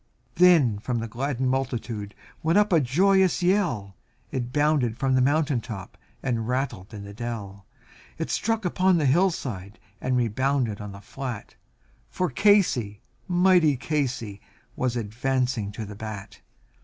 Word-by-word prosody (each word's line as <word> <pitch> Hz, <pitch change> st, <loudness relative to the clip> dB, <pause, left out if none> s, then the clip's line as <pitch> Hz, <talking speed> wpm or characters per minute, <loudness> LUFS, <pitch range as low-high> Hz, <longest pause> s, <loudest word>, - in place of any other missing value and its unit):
Then 160 Hz, -, +5 dB
from 120 Hz, +3 st, -2 dB
the 115 Hz, 0 st, -3 dB
gladdened 130 Hz, +2 st, -1 dB
multitude 120 Hz, -6 st, -3 dB, 0.3 s
went 165 Hz, +4 st, +2 dB
up 210 Hz, -2 st, +3 dB
a 165 Hz, -, +6 dB
joyous 185 Hz, +8 st, +3 dB
yell, 165 Hz, -, +1 dB, 0.4 s
It 125 Hz, -3 st, -3 dB
bounded 145 Hz, -5 st, +2 dB
from 135 Hz, -1 st, +1 dB
the 130 Hz, -, +4 dB
mountain 145 Hz, -1 st, +2 dB
top 110 Hz, -5 st, -8 dB, 0.3 s
and 115 Hz, -4 st, -1 dB
rattled 125 Hz, -6 st, -2 dB
in 105 Hz, -2 st, -8 dB
the 100 Hz, 0 st, -9 dB
dell, 100 Hz, -4 st, -6 dB, 0.5 s
It -, -, -3 dB
struck 225 Hz, -2 st, 0 dB
upon 185 Hz, +1 st, +3 dB
the 155 Hz, -, +1 dB
hillside, 130 Hz, -, 0 dB, 0.2 s
and 130 Hz, 0 st, +1 dB
rebounded 125 Hz, -1 st, 0 dB
on 105 Hz, -1 st, -6 dB
the 100 Hz, 0 st, -11 dB
flat, 125 Hz, 0 st, -6 dB, 0.6 s
For 180 Hz, -4 st, -1 dB
Casey, 125 Hz, -, +3 dB, 0.2 s
mighty 175 Hz, -5 st, +4 dB
Casey, 130 Hz, -8 st, -2 dB, 0.3 s
was 125 Hz, -1 st, -1 dB
advancing 120 Hz, 0 st, -1 dB
to 110 Hz, +1 st, -5 dB
the 105 Hz, 0 st, -9 dB
bat. 110 Hz, -2 st, -8 dB
130 Hz, 145 wpm, -25 LUFS, 110-155 Hz, 0.6 s, a